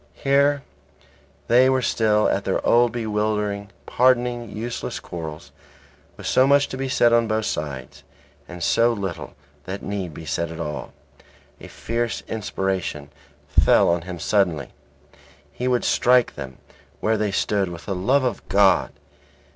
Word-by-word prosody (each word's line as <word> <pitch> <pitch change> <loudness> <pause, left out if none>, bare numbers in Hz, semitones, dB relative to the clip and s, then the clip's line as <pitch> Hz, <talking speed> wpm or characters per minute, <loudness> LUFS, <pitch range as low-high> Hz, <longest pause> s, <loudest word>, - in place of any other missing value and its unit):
Here 140 0 +2 0.8
they 125 +2 +5
were 130 -1 +1
still 110 -2 +2
at - - 0
their - - -1
old 120 0 +4
bewildering, 105 -2 -2 0.2
pardonable, 125 -1 +2
useless 115 +3 -5
quarrels, 80 -2 -8 0.7
with - - -10
so 130 +1 +4
much 140 0 +4
to - - -5
be 135 0 -3
said 120 -2 +3
on 115 -1 +3
both 110 0 -1
sides, 70 -4 -5 0.5
and 90 -1 -7
so 115 +6 +3
little 95 -6 -5 0.3
that 95 +2 -6
need 95 -6 -4
be 80 - -9
said 80 +3 -2
at 80 - -8
all. 75 -3 -5 0.7
A - - -10
fierce 115 0 -3
inspiration 95 -8 -3 0.4
fell - - +4
on 85 0 +1
him 90 +1 -7
suddenly; 85 -5 0 0.8
he 125 - -4
would 125 -1 +1
strike 125 0 +3
them 65 -3 -8 0.4
where 110 +1 +1
they 105 -1 0
stood 100 -1 0
with 85 -1 -9
the 100 - -2
love 130 +10 +2
of 125 - -3
God. 100 0 +4
105 Hz, 145 wpm, -23 LUFS, 90-120 Hz, 0.8 s, they